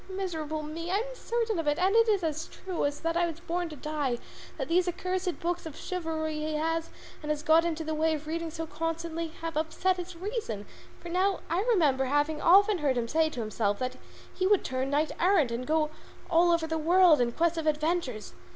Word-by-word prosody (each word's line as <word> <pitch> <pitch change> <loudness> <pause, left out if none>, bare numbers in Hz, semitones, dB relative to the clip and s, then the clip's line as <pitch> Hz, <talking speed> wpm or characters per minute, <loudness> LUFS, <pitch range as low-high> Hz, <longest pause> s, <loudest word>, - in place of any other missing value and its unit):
Miserable 320 -5 -3
me! 325 +3 -5
I 375 - +1
am - - -2
certain 460 -5 -1
of 325 - -3
it, 295 +1 +2
and 375 +4 +2
it 455 0 +5
is 400 -4 +2
as 315 -1 -2
true 370 -5 -4
as 285 0 -2
that 330 0 -1
I 345 0 +2
was 330 -1 -6
born 345 0 -2
to 305 - -8
die, 290 -3 -2 0.4
that - - -3
these 355 +2 +2
accursed 365 0 -2
books 345 0 -2
of 310 - -9
chivalry 320 -3 -3
he 310 0 -2
has, 325 +1 -1 0.3
and 300 - -6
has 300 0 -1
got 325 0 +5
into 325 -1 -2
the 315 0 -3
way 315 +1 +2
of 305 0 -7
reading 330 +1 -3
so 325 0 -5
constantly, 330 +1 -3
have 330 -1 -4
upset 325 +4 0
his 355 0 -6
reason; 355 - -4 0.3
for 345 - -9
now 375 +3 +1
I 345 +3 +2
remember 300 - +3
having 290 +3 +1
often 400 +2 +6
heard 275 -4 +1
him 235 -1 0
saying 315 +5 +2
to 240 - -3
himself 215 -2 -1
that 255 0 -3 0.4
he 370 - 0
would 410 -1 +3
turn 260 +1 -1
knight 295 +2 +1
errant 345 -8 +3
and 240 +2 -3
go 310 0 +1 0.4
all 345 +1 +5
over 335 -1 +2
the 320 0 -2
world 340 -2 +5
in 240 -1 +1
quest 335 +2 +1
of 315 - -3
adventures. 305 - -1
325 Hz, 220 wpm, -29 LUFS, 305-355 Hz, 0.4 s, often